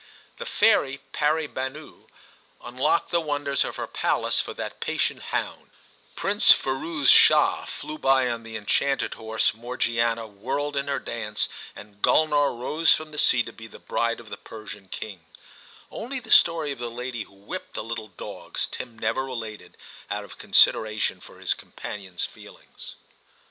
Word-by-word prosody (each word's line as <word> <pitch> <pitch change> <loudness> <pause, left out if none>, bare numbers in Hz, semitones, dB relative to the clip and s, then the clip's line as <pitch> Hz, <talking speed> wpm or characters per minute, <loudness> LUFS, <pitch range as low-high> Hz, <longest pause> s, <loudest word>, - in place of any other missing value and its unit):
The - - -6
fairy 135 +1 +3
Pari 155 +1 +1
banou 135 +3 -6 0.5
unlocked 135 +8 0
the 170 -1 +3
wonders 145 -2 0
of - - -5
her - - -3
palace - - +1
for - - -2
that - - -6
patient - - -1
hound; - - -3 0.5
Prince - - +5
Firouz 140 +2 +1
Shah - - +6
flew 155 0 -7
by 135 -1 +4
on 115 -1 -2
the 115 -1 -6
enchanted 135 +6 0
horse, 110 0 0
Morgiana 115 0 0
whirled 140 +8 -3
in 140 0 -1
her 140 - 0
dance, 105 -2 -2 0.3
and 105 -1 -13
Gulnar^ 145 -5 +3
rose 155 +6 +2
from 155 -1 -7
the 150 - -5
sea 120 -2 +4
to 115 - -9
be 110 - -10
the - - -13
bride 115 0 -1
of 115 -3 -13
the 100 - -5
Persian 105 -3 -10
king; 95 -2 -7 0.7
only 260 +4 -5
the 225 -2 -11
story 165 -3 +5
of 135 - -6
the 120 -1 -3
lady 120 0 -4
who 100 - -22
whipped 100 +1 -8
the - - -3
little 115 -1 -5
dogs 95 - -5
Tim 115 -2 -7
never 115 +4 0
related, 115 -5 -7 0.3
out 105 0 -2
of 100 - -13
consideration 110 -1 +3
for - - -14
his - - +1
companion's 95 -4 -6
feelings. - - -12
120 Hz, 160 wpm, -25 LUFS, 110-145 Hz, 0.7 s, Shah